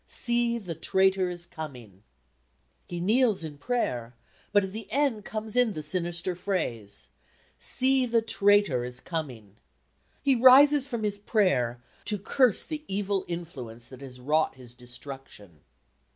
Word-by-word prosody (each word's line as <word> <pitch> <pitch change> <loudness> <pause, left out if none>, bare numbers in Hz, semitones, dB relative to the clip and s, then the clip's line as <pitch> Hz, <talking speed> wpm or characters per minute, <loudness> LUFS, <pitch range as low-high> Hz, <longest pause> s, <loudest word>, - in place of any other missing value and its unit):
"See 235 -1 +2
the 185 -7 -6
traitor 190 +3 +2
is 175 -1 -6
coming." 125 - -9 0.9
He 175 - -5
kneels 215 +1 +2
in 150 -3 -7
prayer, 125 - -2 0.4
but 205 - +4
at 190 - -5
the 210 -1 -8
end 255 -6 0
comes 215 0 -4
in 245 -4 +3
the 155 - -5
sinister 175 +2 -1
phrase, 160 - -3 0.5
"See 260 0 +2
the 230 -1 +2
traitor 205 - +3
is 125 0 -5
coming." 125 - -6 0.7
He 275 -1 +4
rises 265 +3 +7
from 235 -5 -4
his 205 -1 -1
prayer 135 - +1 0.2
to 210 - 0
curse 230 +3 +2
the 305 -1 -6
evil 195 0 -1
influence 135 -10 -7
that 130 0 -12
has 130 -2 -10
wrought 150 +4 +1
his 125 -2 -14
destruction. 125 - -9
180 Hz, 140 wpm, -27 LUFS, -, 0.9 s, rises